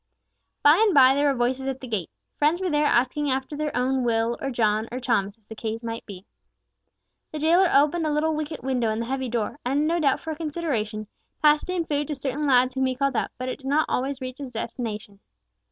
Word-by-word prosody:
By 295 +3 +7
and 410 -6 +2
by 265 -1 +7
there 285 +1 +2
were 275 - +2
voices 255 +2 0
at 265 -1 -3
the 260 - -8
gate. 210 -8 -3 0.3
Friends 305 +4 +2
were 370 -2 -1
there 295 0 +2
asking 270 +4 +1
after 265 +2 -2
their 300 0 -2
own 260 +1 +1
Will, 230 0 +1
or 275 - -2
John, 220 -3 0
or 250 - -4
Thomas, 215 -5 0
as 220 - -36
the 220 - -9
case 220 +1 -5
might 230 0 -5
be. 195 -2 -10 1.1
The 310 - -5
jailer 340 +4 +4
opened 305 +4 +3
a - - 0
little 310 +2 +1
wicket 305 -3 -4
window 250 -4 0
in 220 +1 -1
the 230 - -2
heavy 260 0 -3
door, 235 +4 -2
and, 275 +4 +1
no 335 +2 +1
doubt 280 -4 +2
for 320 - -6
a - - -4
consideration, 285 -10 -3 0.4
passed 300 +3 +4
in 360 -2 -1
food 295 -2 -1
to 300 - -3
certain 280 +2 -2
lads 255 -1 +4
whom 265 0 +1
he 255 - -1
called 275 0 0
out, - - 0
but 255 - -4
it 255 - -4
did 270 - -9
not 300 +3 +2
always 270 +1 -2
reach 255 +1 -6
its 275 -2 -6
destination. 220 -3 -5
265 Hz, 235 wpm, -25 LUFS, 235-295 Hz, 1.1 s, By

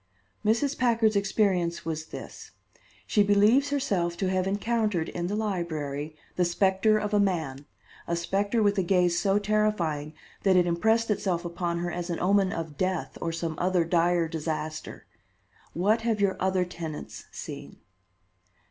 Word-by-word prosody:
"Mrs. 235 +7 +2
Packard's 230 -3 +3
experience 195 -4 +1
was 160 -1 -3
this. - - -9 0.6
She 210 - +2
believes 210 +8 +4
herself 195 -12 0
to 190 -2 0
have 185 0 0
encountered 205 -3 0
in 175 0 -3
the 205 - -2
library 160 -8 -3 0.2
the 180 - +3
specter 190 +4 +3
of 210 0 -2
a 205 - +4
man; 160 -8 -1 0.4
a 170 - 0
specter 200 +6 0
with 205 -1 +2
a - - +4
gaze 180 -1 +2
so 195 0 +2
terrifying 205 -8 0 0.3
that 195 -2 +3
it 180 -1 +5
impressed 220 +7 +2
itself 185 -4 -1
upon 170 0 -2
her 175 0 -2
as 175 0 -4
an 170 - -2
omen 195 +1 +3
of 160 -5 -5
death, 185 -2 -1
or 165 - -1
some 165 0 -3
other 180 -1 +2
dire 170 0 +2
disaster. 155 -1 -5 0.7
What 210 +7 +2
have 225 -2 0
your 200 -1 +2
other 190 -1 +1
tenants 165 -4 -7
seen?" - - -8
185 Hz, 155 wpm, -27 LUFS, 170-210 Hz, 0.7 s, it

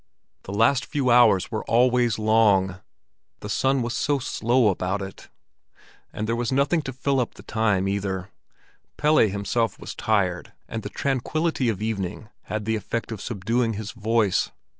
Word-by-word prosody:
The - - -7
last 115 +6 +3
few 135 -5 0
hours 115 -6 +5
were 110 - -2
always 120 -1 +3
long—the 105 -2 0
sun 135 +4 +1
was 120 +1 -3
so 145 0 +1
slow 120 -2 +1
about 95 +1 -1
it. 95 -1 -9 0.8
And 105 - -4
there 115 - 0
was 120 0 -2
nothing 140 +5 +2
to 135 - -5
fill 135 +1 0
up 120 - -2
the - - -13
time 105 -4 +1
either. 100 -1 -3 0.7
Pelle 150 +1 +3
himself 105 +3 +1
was - - -7
tired, 95 -5 -1
and 115 - -5
the 105 - -6
tranquillity 140 +2 -1
of 105 -2 -3
evening 105 -1 -3 0.2
had 105 -1 -4
the 110 0 0
effect 115 +2 -4
of 110 - -5
subduing 115 +2 -1
his 110 0 -5
voice. 110 -3 +1
110 Hz, 160 wpm, -24 LUFS, 100-125 Hz, 0.8 s, hours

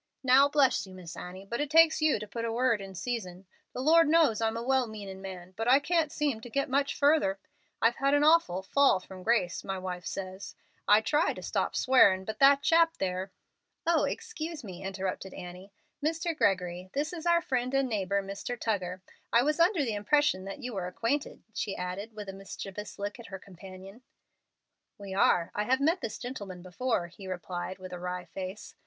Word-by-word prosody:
"Now 265 +2 +6
bless 280 -8 +2
you, 185 - -12
Miss 180 -2 -9
Annie, 185 +2 -8
but 235 +6 -3
it 295 - -2
takes 320 0 +5
you 310 -1 +3
to 210 0 -7
put 230 +2 -5
in 230 - -1
a - - -2
'word 230 -2 +1
in 195 -1 -9
season.' 185 -3 -4 0.3
The 250 - -5
Lord 330 +3 +5
knows 305 -9 +4
I'm 225 0 0
a 230 - -4
well 260 -1 +2
meanin' 200 -3 -8
man, 185 -1 -8
but 225 +3 -3
I 255 +2 +7
can't 320 0 +1
seem 285 -7 -1
to 240 - -9
get 275 +2 -1
much 280 +1 +1
furder. 285 -10 +3 0.5
I've 230 +1 +4
had 275 +1 +2
an 290 - +3
awful 295 - +4
'fall 275 -1 +4
from 185 0 -11
grace,' 200 -4 +1
my 195 0 -3
wife 180 -1 -5
says. 190 0 -6 0.3
I 210 +1 +6
did - - -22
try 300 +2 +2
to - - -9
stop - - -1
swearin', 200 -8 +5
but 220 - -5
that 275 +1 +6
chap 330 0 +4
there 185 0 -2 0.3
" - - -53
"Oh, 335 -1 +3
excuse 335 - -5
me," 185 -3 -8
interrupted 190 0 -4
Annie. 180 +2 -9 0.3
"Mr. 330 +2 -1
Gregory, 185 -6 0
this 300 +4 -2
is 345 0 -5
our 340 0 +5
friend 255 -4 -1
and 270 -1 +2
neighbor 200 -3 -1
Mr. 200 +5 -5
Tuggar. 185 -4 -2 0.3
I 235 - +5
was 300 +3 0
under 335 -2 +4
the 225 - -1
impression 210 -1 +2
that 195 +8 -7
you 245 -1 -4
were 185 -3 -3
acquainted," 230 +10 -2
she 200 - -3
added, 195 +5 -5
with 210 -1 -7
a 195 - -6
mischievous 195 +1 -8
look 205 +3 -5
at 235 - -10
her 190 - -7
companion. 190 +3 -12 1.0
"We 200 -2 -8
are. 175 -3 +3
I 210 - -1
have 260 +3 +2
met 325 +6 +2
this 220 - -4
gentleman 205 -8 -7
before," 205 +2 -1
he 185 +3 -11
replied, 185 0 -5
with 185 -1 -9
a 180 - -6
wry 180 0 -4
face. 190 +2 -7
215 Hz, 210 wpm, -29 LUFS, 190-275 Hz, 1.0 s, I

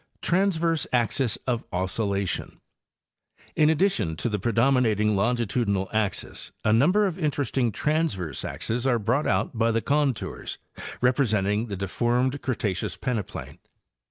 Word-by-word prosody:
Transverse 170 -4 +1
Axes 120 -1 +1
of 120 -2 -1
Oscillation 100 +1 -2 1.0
—In 150 0 +4
addition 160 - +1
to 120 - -2
the 105 -1 -1
predominat 115 0 +2
ing 105 0 +2
longitudinal 105 -2 0
axes 110 -3 -2
a 110 - +4
number 180 - +4
of 190 -2 -2
interesting 135 -6 0
transverse 105 - -1
axes 120 +3 -2
are 125 -2 +3
brought 120 +7 0
out - - 0
by 115 0 +2
the 115 0 +2
contours 145 -4 -1 0.4
representing 110 -4 +2
the 100 -3 -4
deformed 120 +8 0
Cre 130 - 0
taceous 100 -5 -2
peneplain? 120 -7 -4
120 Hz, 130 wpm, -26 LUFS, 105-140 Hz, 1.0 s, In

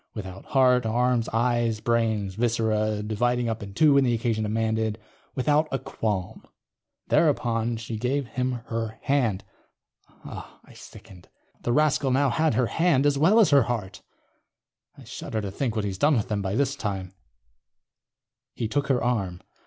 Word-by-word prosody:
Without 95 -3 -8
heart, 125 -2 +3
arms, 120 +1 +1
eyes, 115 -1 0
brains, 110 -4 0
viscera, 110 -1 0
dividing 120 +3 0
up 115 0 -3
in 100 -1 -9
two 150 +3 +5
when 140 0 +5
the 120 -2 +2
occasion 115 -1 -1
demanded. 110 0 -1 0.4
Without 150 +4 +2
a 135 - 0
qualm.... 105 -6 -4 0.7
thereupon 120 -7 +1
she 115 0 -6
gave 135 +4 -1
him 125 +2 -1
her 115 -1 -4
hand. 125 -9 +1 0.8
I - - -11
sickened. 90 -3 -14 0.3
The 120 - -1
rascal 150 0 +2
now 135 +1 +2
had 160 -2 +1
her 125 - +2
hand, 160 0 +2
as 140 -1 +2
well 190 +9 +5
as 200 -8 +5
her 140 -1 +6
heart. 110 -6 -4 1.0
I - - -13
shudder 110 - -5
to 100 -2 -4
think 120 +2 -2
what 110 -2 -1
he's 95 -2 -4
done 150 +4 +4
with 110 - -2
them, 105 -2 -1
by 95 +1 -2
this 140 +2 +1
time. 100 -8 -4
_... - - -27 1.4
he 115 - -2
took 140 +5 -1
her 130 -3 +1
arm. 100 -8 -1
115 Hz, 160 wpm, -25 LUFS, 110-135 Hz, 1.4 s, her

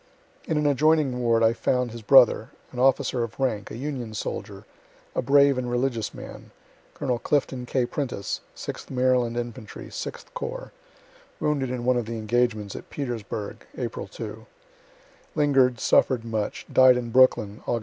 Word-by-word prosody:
In 160 - -1
an 150 - +1
adjoining 145 -2 +3
ward 115 -1 +3
I 115 0 +5
found 125 0 0
his 115 0 -8
brother, 120 -1 +6 0.2
an 125 - -7
officer 130 -1 +2
of 115 +1 -5
rank, 110 -6 -1
a - - -7
Union 125 -5 -5
soldier, - - -5 0.5
a - - 0
brave 140 +1 +4
and 125 -1 -3
religious 120 -3 -1
man, - - -10 0.5
(Col. 125 -2 -1
Clifton 130 -3 -1
K. 130 -1 +1
Prentiss, 125 -6 -3
sixth - - -7
Maryland 125 -2 +1
infantry, 120 -3 -6
Sixth - - -7
corps, - - -5 0.7
wounded 140 -4 0
in 125 -1 -4
one 125 0 +3
of 120 -3 -2
the 115 0 -4
engagements 110 -2 0
at - - -9
Petersburgh, 115 -6 -5
April - - -4
2 - - -8 0.9
linger'd, 135 -5 +3
suffer'd 125 -4 +3
much, 110 -2 -3
died 130 -1 +7
in 120 -1 -4
Brooklyn, 110 -5 +3
Aug. 120 - +1
125 Hz, 155 wpm, -25 LUFS, 115-135 Hz, 0.9 s, died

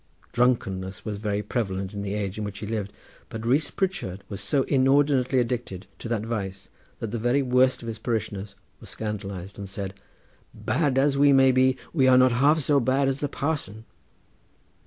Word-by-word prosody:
Drunkenness 95 -6 0
was 105 -2 -3
very 105 0 -2
prevalent 95 -3 -3
in 100 - -4
the 100 0 -3
age 100 -1 -3
in - - -3
which 105 -1 -5
he 105 - -6
lived, 105 -2 -3 0.4
but 115 0 -6
Rees 140 +6 +2
Pritchard 180 - -3
was 100 - -5
so 140 -3 +1
inordinately 135 -1 +3
addicted 120 -6 -2
to - - -6
that 110 -2 -1
vice 100 -4 -4 0.3
that 115 - -5
the 120 - -2
very 120 +5 +2
worst 125 0 +2
of - - -7
his 110 -1 -5
parishioners 105 -4 -3 0.2
were - - -13
scandalised 100 -3 -5
and 100 -1 -6
said: 95 0 -5 0.6
"Bad 135 +2 0
as 140 0 +3
we 145 0 +6
may 135 -1 +6
be 130 0 +3 0.2
we 135 -6 +3
are 130 -1 +7
not 130 0 +6
half 140 +6 +4
so 145 0 +3
bad 135 +2 +2
as 135 0 -1
the 145 - -2
parson." 135 -9 -3
115 Hz, 185 wpm, -25 LUFS, 100-135 Hz, 0.6 s, are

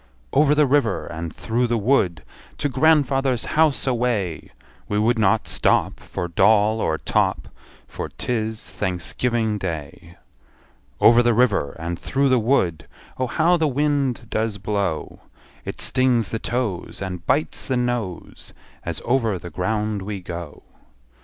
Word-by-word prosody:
Over 150 0 +4
the 150 0 +4
river, 130 -7 +1
and 85 -1 -6
through 120 +8 -1
the 120 0 0
wood, 100 - +1 0.3
To 145 - 0
grandfather's 135 -3 +2
house 155 -2 +3
away! 115 - -1 0.4
We 105 - 0
would 115 +2 +2
not 105 +1 +2
stop - - +1
For 90 - -5
doll 105 +5 +3
or 80 - 0
top, - - 0 0.4
For - - -6
't - - -8
is 110 -1 -2
Thanksgiving 105 +4 -1
Day. 85 -1 -6 0.8
Over 120 +1 +7
the 120 -1 +2
river, 105 - +2
and 85 +1 -4
through 140 0 +1
the 130 -1 +4
wood, 90 - +1 0.3
Oh, 130 - 0
how 170 +6 +2
the 160 -2 +1
wind 140 -3 0
does 110 -1 -1
blow! 100 -5 -3 0.5
It - - -6
stings 125 -4 +2
the 115 - -2
toes, 110 -8 -3
And 90 -3 -5
bites 145 +4 0
the 130 - 0
nose, 120 -7 -4 0.3
As - - -5
over 115 -5 +1
the 85 0 -9
ground 105 +4 -1
we 100 +1 -5
go. 85 -3 -8
110 Hz, 145 wpm, -22 LUFS, 95-130 Hz, 0.8 s, Over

